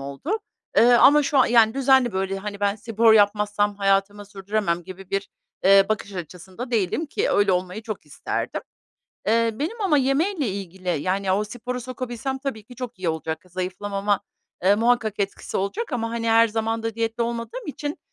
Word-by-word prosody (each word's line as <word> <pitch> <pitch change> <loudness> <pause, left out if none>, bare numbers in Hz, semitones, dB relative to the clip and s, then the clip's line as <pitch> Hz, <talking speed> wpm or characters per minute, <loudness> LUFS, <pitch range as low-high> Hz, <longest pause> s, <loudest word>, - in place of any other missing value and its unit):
oldu. 140 - -3 0.4
Eee, 245 +2 +7
ama 290 +4 +7
şu 285 0 +1
an 260 - +6
yani, 230 -1 +4
düzenli 265 -4 +4
böyle, 195 +1 -2
hani, 200 0 -6
"Ben, 200 +1 +1
spor 225 0 +3
yapmazsam 205 -1 +2
hayatımı 200 +1 +1
sürdüremem." 195 -3 -2
gibi 185 0 -11
bir, 195 0 -2 0.4
eee, 195 0 +7
bakış 215 -2 -2
açısında 185 - -8
değilim, 225 - 0
ki 425 - -1
öyle 200 -2 +3
olmayı 180 +4 -2
çok 215 -8 -6
isterdim. 150 0 -3 0.7
Eee, 230 +1 +3
benim 325 - -4
ama 330 -8 +3
yemeyle 285 - +1
ilgili, 190 -1 -6
yani, 185 +4 0
o 205 +3 +1
sporu 245 +3 -5
sokabilsem 255 +1 -4
tabii 265 -6 -5
ki 245 - -13
çok 245 -3 -7
iyi 180 -3 -2
olacak. 160 0 -3
Zayıflamama, 195 +3 -2 0.4
eee, 200 +2 +6
muhakkak 225 -2 +1
etkisi 195 - -3
olacak 290 - -2
ama, 230 -2 -1
hani, 230 0 -1
her 230 0 +5
zaman 225 +1 -2
da 225 -1 -3
diyette 230 +1 -1
olmadığım 235 - -4
için, 295 0 -5
215 Hz, 170 wpm, -23 LUFS, 195-245 Hz, 0.7 s, Eee